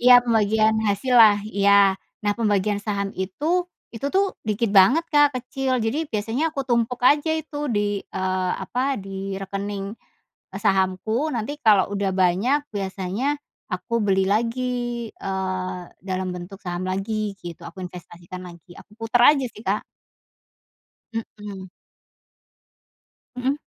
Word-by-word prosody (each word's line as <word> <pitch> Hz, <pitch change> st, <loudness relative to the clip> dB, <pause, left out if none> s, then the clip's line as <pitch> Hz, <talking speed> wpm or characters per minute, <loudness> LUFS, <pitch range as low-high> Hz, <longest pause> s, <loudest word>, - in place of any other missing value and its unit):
Iya, 250 Hz, +1 st, +8 dB
pembagian 220 Hz, -1 st, +3 dB
hasillah 220 Hz, 0 st, +5 dB
iya. 200 Hz, -2 st, +4 dB, 0.3 s
Nah 205 Hz, -, +3 dB
pembagian 205 Hz, -2 st, +1 dB
saham 200 Hz, -1 st, -1 dB
itu, 300 Hz, -, 0 dB, 0.3 s
itu 230 Hz, +5 st, -3 dB
tuh 390 Hz, 0 st, +2 dB
dikit 215 Hz, +1 st, 0 dB
banget, 225 Hz, -, +6 dB
Kak, 290 Hz, -1 st, +5 dB
kecil. 255 Hz, +1 st, -1 dB
Jadi 240 Hz, +9 st, 0 dB
biasanya 225 Hz, +9 st, -1 dB
aku 280 Hz, -, -2 dB
tumpuk 240 Hz, +1 st, +1 dB
aja 295 Hz, +4 st, +4 dB
itu 315 Hz, -1 st, -4 dB
di, 205 Hz, -2 st, 0 dB
eee, 185 Hz, -1 st, -2 dB
apa, 265 Hz, +2 st, -1 dB
di 195 Hz, 0 st, -5 dB
rekening, 195 Hz, 0 st, -4 dB, 0.7 s
eee, -, -, -6 dB
sahamku 200 Hz, +7 st, +1 dB
nanti 230 Hz, +3 st, -2 dB
kalau 205 Hz, -3 st, +4 dB
udah 200 Hz, -1 st, 0 dB
banyak 190 Hz, +10 st, +3 dB
biasanya 195 Hz, +3 st, -3 dB, 0.5 s
aku 235 Hz, -, -5 dB
beli 195 Hz, -1 st, +3 dB
lagi, 230 Hz, +4 st, +1 dB, 0.5 s
eee, 185 Hz, -1 st, -3 dB, 0.2 s
dalam 185 Hz, 0 st, -3 dB
bentuk 180 Hz, +2 st, -8 dB
saham 175 Hz, -1 st, -4 dB
lagi 205 Hz, +2 st, -2 dB
gitu, 170 Hz, -2 st, -8 dB
aku -, -, -13 dB
investasikan 175 Hz, 0 st, -10 dB
lagi. 175 Hz, 0 st, -14 dB
Aku -, -, -18 dB
puter 225 Hz, +1 st, +1 dB, 0.2 s
aja 270 Hz, -, -1 dB
sih, 210 Hz, -, -12 dB
Kak. 200 Hz, +3 st, 0 dB, 1.3 s
Mmm. 205 Hz, -4 st, -7 dB, 1.7 s
Hmm. 255 Hz, +2 st, 0 dB
205 Hz, 130 wpm, -23 LUFS, 190-240 Hz, 1.7 s, Iya